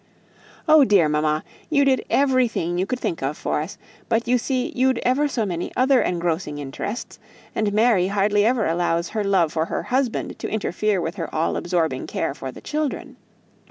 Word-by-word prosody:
"Oh 310 -1 +7
dear, 200 - +4
mamma, 150 +1 0 0.3
you 285 -3 +3
did 265 -1 +2
everything 250 -11 +1
you 190 - 0
could 255 +2 -2
think 165 - -3
of 135 +3 -2
for - - -1
us; 160 +6 -7 0.3
but 230 0 +1
you 250 0 +3
see 255 0 -1
you'd 260 0 +2
ever 275 +4 +2
so 240 -6 -1
many 175 -3 -3
other 260 0 +4
engrossing 170 -3 -1
interests, 145 - -6 0.3
and 215 -2 0
Mary 210 -3 +3
hardly 205 +1 +2
ever 230 0 +2
allows 170 +1 0
her 215 -1 -2
love 190 -6 +2
for 160 0 0
her - - -3
husband 255 -2 -1
to - - -4
interfere 215 -2 0
with 170 +2 -4
her 165 -3 -4
all 160 +1 0
absorbing 165 -7 -1
care - - -2
for 135 -2 -7
the - - -12
children. 300 -1 -3
205 Hz, 185 wpm, -23 LUFS, 165-250 Hz, 0.3 s, Oh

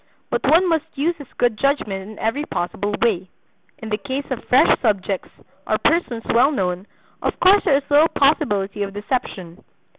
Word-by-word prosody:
But - - -1
one 345 +4 +5
must 325 -3 +1
use 330 +5 0
his 285 -4 -12
good 235 -3 +1
judgment 210 -9 -1
in 215 - -11
every 250 +7 -1
possible 205 - -3
way. 190 -6 0 0.5
In 225 - -8
the 210 0 -1
case 275 +2 -4
of 255 - -3
fresh 255 - +4
subjects, 200 -4 -1 0.4
or - - +1
persons 255 -9 0
well 240 +4 +5
known, 185 -6 -2 0.3
of - - -2
course 390 +3 +5
there 275 - +4
is 285 - -4
little 295 +2 +5
possibility 210 -10 +1
of 200 0 -4
deception. 205 -5 -4
230 Hz, 175 wpm, -21 LUFS, 200-285 Hz, 0.5 s, one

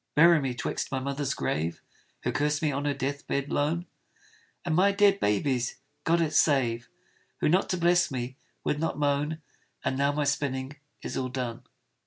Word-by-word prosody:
Bury 165 +1 +7
me 130 -2 -2
'twixt - - -3
my 135 - 0
mother's 140 +1 -2
grave, 80 +2 -2 0.4
(Who - - 0
cursed 150 +1 0
me 155 - +2
on 140 +1 -2
her 145 - +1
death 140 +1 -3
bed 140 0 -1
lone) 160 +4 0 0.8
And 170 - 0
my 195 +3 +5
dead 200 0 +4
baby's 120 +4 +1 0.3
(God 170 +1 +3
it 155 -2 0
save!) 120 -6 +2 0.5
Who, - - +2
not 180 +5 +3
to 185 - 0
bless 175 0 +3
me, 130 -2 -4 0.3
would 150 - 0
not 165 -1 -1
moan. 150 +2 0 0.4
And 130 - +1
now 140 +1 +3
my 150 +1 0
spinning 140 0 -1 0.3
is - - -4
all 130 -1 -1
done. 125 -2 -4
145 Hz, 180 wpm, -28 LUFS, 130-160 Hz, 0.8 s, Bury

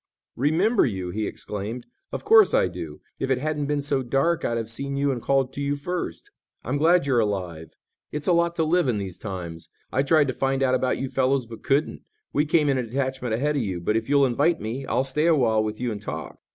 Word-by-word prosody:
"Remember 175 - +3
you!" 95 -6 -2
he 105 +3 -2
exclaimed. 105 +4 -6 0.3
"Of - - -5
course 440 +2 +6
I - - +4
do. - - -8 0.2
If 135 - -2
it 130 - +2
hadn't 150 +1 -2
been 145 -1 -1
so 140 -2 +1
dark 135 +7 +1
I'd 115 - 0
have 115 -1 -3
seen 140 +3 -3
you 140 0 +1
and 125 -3 -3
called 135 0 +1
to 140 - -5
you 140 0 0
first. 145 - -4 0.3
I'm 135 +4 -2
glad 170 0 +4
you're 130 -4 +2
alive. 90 -7 -3 0.4
It's 150 -1 -4
a 180 - +3
lot 170 0 +2
to 165 - +1
live 170 0 +2
in 120 -4 +1
these 95 -3 -5
times. 85 -5 -7 0.2
I 130 - +2
tried 145 +1 +3
to - - -1
find 135 +1 0
out 130 -1 +2
about 130 0 +1
you 135 - -3
fellows 130 0 +1
but 115 0 -10
couldn't. 140 +3 0 0.3
We 150 - +2
came 155 -1 +3
in 135 -2 +2
a - - -1
detachment 130 -1 -2
ahead 145 +5 0
of - - +1
you. 95 -5 -3
But 95 +5 0
if 115 +2 -1
you'll 140 -1 +5
invite 145 +7 +2
me, 125 +5 -5
I'll 130 - +1
stay 150 +4 0
awhile 120 -9 +3
with 105 0 -4
you 125 -1 -1
and 105 -2 -5
talk." - - -6
135 Hz, 235 wpm, -25 LUFS, 115-150 Hz, 0.4 s, course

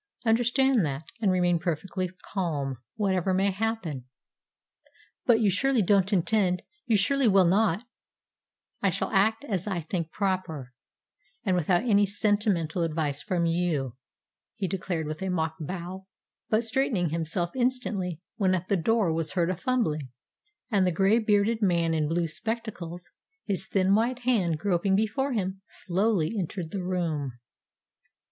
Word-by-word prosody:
Understand 240 +1 +3
that, 145 -1 -2 0.2
and 200 -4 +3
remain 175 -2 +2
perfectly 185 +2 -2
calm, 145 - -2 0.2
whatever 190 -3 +1
may 195 +1 +2
happen." 190 - -3 1.2
"But 235 -2 +5
you 205 -3 +4
surely 250 +4 +2
don't 195 +1 +3
intend 185 -1 +2 0.2
you 225 -3 +4
surely 270 +6 +2
will 195 -3 +5
not 200 +2 +2 0.5
" - - -56
"I 195 - +3
shall 185 +2 -2
act 220 +3 +2
as 195 - -2
I 190 -4 -1
think 165 0 -3
proper, 185 -10 -2 0.7
and 190 -3 +2
without 175 +2 +2
any 205 -4 +4
sentimental 200 -5 0
advice 155 -3 -1
from 170 +2 0
you," 165 -7 0 0.6
he 205 -4 -2
declared 175 -3 -2
with 155 +3 -5
a 190 - -2
mock 160 -3 -1
bow, 180 +4 -6 0.4
but 220 +1 +2
straightening 225 - +1
himself 165 +2 -1
instantly 240 -9 -1 0.2
when 185 -2 +3
at 185 0 -4
the 200 - +3
door 195 0 +2
was 160 -2 -2
heard 170 +1 +1
a - - -2
fumbling, 170 - -1 0.6
and 200 -3 +3
the 180 - +2
gray 195 +6 +3
bearded 215 +1 +2
man 170 -4 +2
in 155 -2 +1
blue 170 +1 +1
spectacles, 185 -2 -5 0.4
his 195 -3 -2
thin 190 0 +2
white 240 +4 +1
hand 195 -10 +2
groping 190 +1 +1
before 255 +7 0
him, 190 -3 -2
slowly 190 -2 0
entered 180 -3 -3
the 195 - -3
room. 165 -7 -2
185 Hz, 150 wpm, -27 LUFS, 170-215 Hz, 1.2 s, But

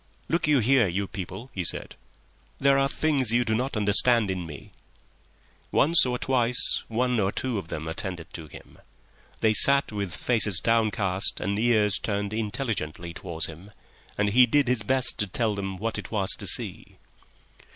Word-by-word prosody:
"Look 170 -1 0
you 145 -4 +3
here, 120 -1 +3
you 95 +3 -3
people," 95 +5 -9
he 95 - -4
said. - - -2 0.7
"There 140 0 +3
are 135 0 +1
things 140 -7 0
you 120 0 +1
do 110 - -1
not 125 +2 -2
understand 105 +1 +3
in 90 -2 -5
me." 75 -4 -12 1.0
Once 155 -1 +4
or 125 0 -2
twice 125 -1 +1
one 125 +1 -1
or 95 -1 0
two 125 -3 -3
of 90 - -10
them 80 -1 -6
attended 85 0 -6
to 80 -3 -9
him; 75 - -15 0.6
they 110 -1 +2
sat 140 +5 +5
with 100 -5 -5
faces 105 -7 +3
downcast 105 -3 +1
and 100 +1 -3
ears 110 -4 +2
turned 100 -1 -4
intelligently 105 - -4
towards 80 -1 -4
him, 80 +5 -11 0.5
and 100 0 0
he 125 +4 +4
did 145 +2 +1
his 125 -2 0
best 130 +4 +1
to 105 - -1
tell 110 +3 -2
them 95 -1 -5
what 115 +3 -4
it - - -9
was 100 -4 0
to - - +1
see. - - -2
110 Hz, 170 wpm, -25 LUFS, 95-125 Hz, 1.0 s, sat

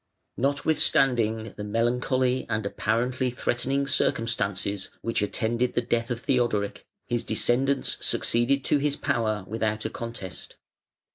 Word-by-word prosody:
Notwithstanding 125 -5 +2
the 105 - -4
melancholy 125 +4 +1
and 110 -1 -1
apparently 120 +5 0
threatening 125 +3 -1
circumstances 100 -6 0
which 115 -2 0
attended 115 +4 0
the - - +3
death 115 +1 0
of 120 -1 -3
Theodoric, 120 -7 0 0.2
his 120 -1 -1
descendants 130 +5 +1
succeeded 130 +4 +2
to 145 - +3
his 145 0 +1
power 110 -8 -1
without 110 0 -2
a 110 - -2
contest. 115 -6 -7
120 Hz, 120 wpm, -26 LUFS, 110-130 Hz, 0.2 s, the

